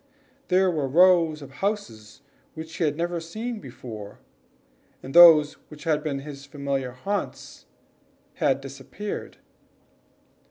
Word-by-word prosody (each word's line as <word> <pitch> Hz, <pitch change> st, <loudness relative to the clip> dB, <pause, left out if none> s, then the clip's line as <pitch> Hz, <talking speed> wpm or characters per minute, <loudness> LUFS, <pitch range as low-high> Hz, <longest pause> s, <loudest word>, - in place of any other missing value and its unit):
There 185 Hz, 0 st, +3 dB
were 150 Hz, -5 st, -1 dB
rows 165 Hz, 0 st, +4 dB
of 135 Hz, -, -12 dB
houses 140 Hz, -, -4 dB, 0.3 s
which 160 Hz, 0 st, -8 dB
he 170 Hz, -, +1 dB
had 150 Hz, -1 st, -1 dB
never 170 Hz, 0 st, -2 dB
seen 220 Hz, +8 st, -6 dB
before, 110 Hz, -, -10 dB, 0.9 s
and 135 Hz, -, -8 dB
those 160 Hz, -4 st, +8 dB, 0.2 s
which 150 Hz, -1 st, -12 dB
had 155 Hz, -2 st, +1 dB
been 140 Hz, -3 st, -3 dB
his 140 Hz, -1 st, -9 dB
familiar 140 Hz, -2 st, -3 dB
haunts 195 Hz, +11 st, -5 dB, 0.7 s
had 135 Hz, 0 st, +1 dB
disappeared. 140 Hz, +10 st, -7 dB
150 Hz, 120 wpm, -25 LUFS, 135-175 Hz, 0.9 s, those